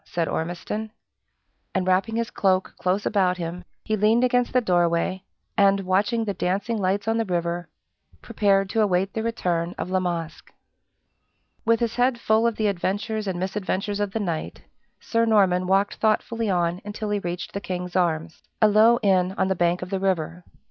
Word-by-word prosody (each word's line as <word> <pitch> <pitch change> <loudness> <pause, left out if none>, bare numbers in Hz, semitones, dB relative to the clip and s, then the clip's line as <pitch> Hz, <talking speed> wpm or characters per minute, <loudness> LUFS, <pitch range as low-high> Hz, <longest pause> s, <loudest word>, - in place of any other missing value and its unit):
said 170 -2 -2
Ormiston. 175 +6 -3 0.9
And 185 - +1
wrapping 190 +5 +1
his 230 0 -2
cloak 190 -1 +1
close 185 +3 0
about 185 -4 +2
him, 175 +1 -5 0.2
he 215 - 0
leaned 215 +4 +3
against 245 -1 +2
the 255 - +4
doorway, 175 -2 +1 0.3
and, 200 0 +4
watching 205 +5 +1
the 200 - -2
dancing 195 +5 -1
lights 200 +2 0
on 225 0 +1
the 225 - 0
river, 175 -1 -2 0.5
prepared 195 -2 +1
to 225 - +2
await 190 -1 +1
the 220 - -2
return 180 -7 -1
of 180 - -4
La 185 - +2
Masque. 170 -3 -4 1.1
With 230 0 +3
his 235 0 -1
head 245 0 +2
full 220 +1 +3
of 230 - -1
the 215 - -1
adventures 205 +3 -1
and 185 -2 -2
misadventures 195 +1 -2
of 205 -1 -1
the 225 - -2
night, 170 -6 -4 0.4
Sir 230 0 0
Norman 190 -5 +3
walked 195 +2 +2
thoughtfully 225 +1 0
on 175 0 0
until 210 +1 -5
he 205 - +1
reached 175 -1 -5
the 200 - -4
King's 180 -1 -5
Arms 165 -2 0 0.2
a 215 - +6
low 220 +3 +5
inn 190 -2 +2
on 190 - +1
the 190 - +1
bank 175 +1 +1
of 180 - -8
the 195 - -1
river. 180 -2 -1
195 Hz, 180 wpm, -24 LUFS, 180-215 Hz, 1.1 s, a